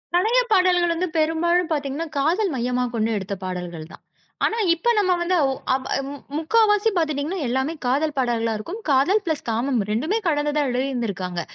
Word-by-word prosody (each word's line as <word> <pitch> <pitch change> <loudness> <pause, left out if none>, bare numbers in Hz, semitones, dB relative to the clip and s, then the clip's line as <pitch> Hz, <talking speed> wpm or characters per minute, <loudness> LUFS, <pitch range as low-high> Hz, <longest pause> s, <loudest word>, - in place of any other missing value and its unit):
பழைய 445 +7 +4
பாடல்கள் 355 -3 +4
வந்து 360 +2 -1
பெரும்பாலும் 330 +2 +1
பாத்தீங்கன்னா, 290 +2 -3
காதல் 340 +5 +1
மையமா 250 +1 0
கொண்டு 220 0 0
எடுத்த 195 +1 -5
பாடல்கள் 175 -3 -6
தான். - - -14 0.4
ஆனா, 455 - 0 0.2
இப்ப 345 +8 -1
நம்ம 390 -3 +3
வந்து 345 +1 +1
ஓ 270 - +1 0.2
ஆப் 260 0 -1 0.2
மு 285 - -6 0.2
முக்காவாசி 415 +5 +3
பாத்துட்டீங்கன்னா, 310 +2 -1
எல்லாமே 265 +6 -1
காதல் 290 +5 +1
பாடல்களா 235 -3 0
இருக்கும். 340 - -6
காதல் 290 +10 +3
பிளஸ் 315 -3 -1
காமம் 240 +2 0
2மே 305 - 0
கலந்துதா 295 -1 +1
எழுதிருந்திருக்காங்க. 230 -9 -2
295 Hz, 155 wpm, -23 LUFS, 245-350 Hz, 0.4 s, பழைய